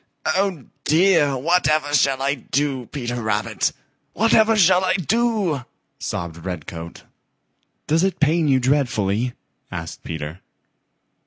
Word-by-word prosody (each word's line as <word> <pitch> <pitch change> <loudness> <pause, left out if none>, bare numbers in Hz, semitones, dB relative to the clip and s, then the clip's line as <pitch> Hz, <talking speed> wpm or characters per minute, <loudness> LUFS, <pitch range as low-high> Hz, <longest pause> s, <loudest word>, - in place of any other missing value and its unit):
"Oh, 190 -7 0 0.2
dear, 160 -4 +3
whatever 155 -1 +1
shall 135 -2 +2
I 140 +1 +2
do, 135 -1 -2
Peter 120 -4 -4
Rabbit? 110 -1 0 0.4
Whatever 225 +1 +4
shall 185 -2 +5
I 185 0 +2
do?" 195 - 0 0.4
sobbed 85 -1 -4
Redcoat. 85 -2 -7 0.8
"Does 160 +3 +2
it 190 -1 0
pain 155 +1 +2
you 135 -2 +4
dreadfully?" 125 -4 0 0.4
asked - - -7
Peter. 80 +1 -6
145 Hz, 110 wpm, -22 LUFS, 120-180 Hz, 0.8 s, shall